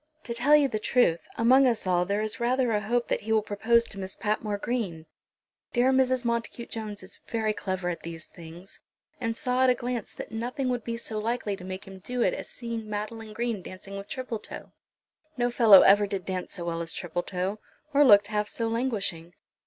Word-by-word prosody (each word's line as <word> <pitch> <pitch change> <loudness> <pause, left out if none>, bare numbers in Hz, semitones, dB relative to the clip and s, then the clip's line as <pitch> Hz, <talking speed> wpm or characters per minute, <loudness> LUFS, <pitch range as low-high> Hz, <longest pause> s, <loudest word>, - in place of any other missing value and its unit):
"To 235 - -4
tell 260 +6 +5
you 295 -2 +5
the 215 -5 -3
truth, 210 -8 +2
among 255 +4 +5
us 230 -5 0
all 180 -1 +2
there 200 +3 0
is 215 +1 -4
rather 245 0 +1
a 210 -1 +1
hope 235 +3 0
that - - -1
he 220 - -5
will 220 -1 +3
propose 225 +3 +2
to 195 - -9
Miss 190 0 -3
Patmore 210 -1 -1
Green. 200 -8 -3 0.7
Dear 250 +1 +4
Mrs. 260 -1 +2
Montacute 235 0 -2
Jones 215 -3 -6
is 185 - -10
very 220 -2 0
clever 185 -3 -3
at 175 -1 -3
these 165 -1 -7
things, 170 +2 -12 0.4
and 230 -2 -2
saw 255 -3 +1
at 260 - +5
a 250 - +4
glance 240 -2 -4
that - - -7
nothing 245 +4 -2
would 245 -2 -1
be 230 +1 -3
so 220 -2 -4
likely 220 -2 -1
to 180 - -12
make 185 +1 -6
him 195 -1 -11
do 245 +5 -2
it - - +2
as - - -6
seeing 230 -3 -5
Madeline 215 +1 -5
Green 235 -3 -2
dancing 185 +2 -9
with 200 +1 -7
Tripletoe. 245 -5 -6 0.7
No 245 0 +1
fellow 220 -6 +8
ever 205 +1 +6
did 195 -2 -4
dance 185 -1 -4
so 175 -3 -5
well 170 -1 -2
as 165 -1 -4
Tripletoe, 180 +3 -3 0.3
or 285 +1 +6
looked 205 -6 +7
half 210 0 -1
so 230 - -2
languishing. 200 -8 -1
215 Hz, 205 wpm, -27 LUFS, 195-240 Hz, 0.7 s, fellow